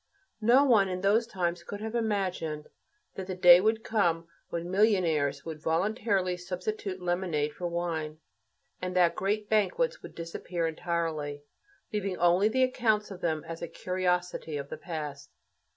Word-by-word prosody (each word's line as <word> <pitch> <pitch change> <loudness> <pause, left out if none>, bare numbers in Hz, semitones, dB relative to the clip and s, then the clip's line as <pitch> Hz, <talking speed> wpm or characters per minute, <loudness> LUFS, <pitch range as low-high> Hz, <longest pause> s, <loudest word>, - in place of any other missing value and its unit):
No 240 +6 +6
one 220 -8 +4
in 185 0 -3
those 215 +4 +3
times 175 -4 -2
could 205 +4 -7
have 220 +1 -5
imagined 185 -9 -2 0.4
that 190 -1 -6
the 185 - -3
day 180 0 +8
would 220 +2 +1
come 175 -8 +1 0.2
when 170 +1 -4
millionaires 170 -9 +2
would 160 -2 -6
voluntarily 190 +2 +1
substitute 185 +2 -4
lemonade 175 -5 -1
for 175 - -4
wine, 165 -3 -3 0.6
and 180 0 -3
that 175 -2 +4
great 205 +2 -1
banquets 470 - +1
would - - -11
disappear 170 +1 -4
entirely, 160 -3 -2 0.5
leaving 195 -3 -1
only 175 +4 +4
the 260 +4 +2
accounts 220 -5 +1
of 185 -2 -8
them 160 -2 -1
as 165 0 -6
a 170 - -3
"curiosity" 180 -3 -1
of 140 0 -6
the - - -4
past. 150 -5 -6
180 Hz, 150 wpm, -29 LUFS, 165-205 Hz, 0.6 s, day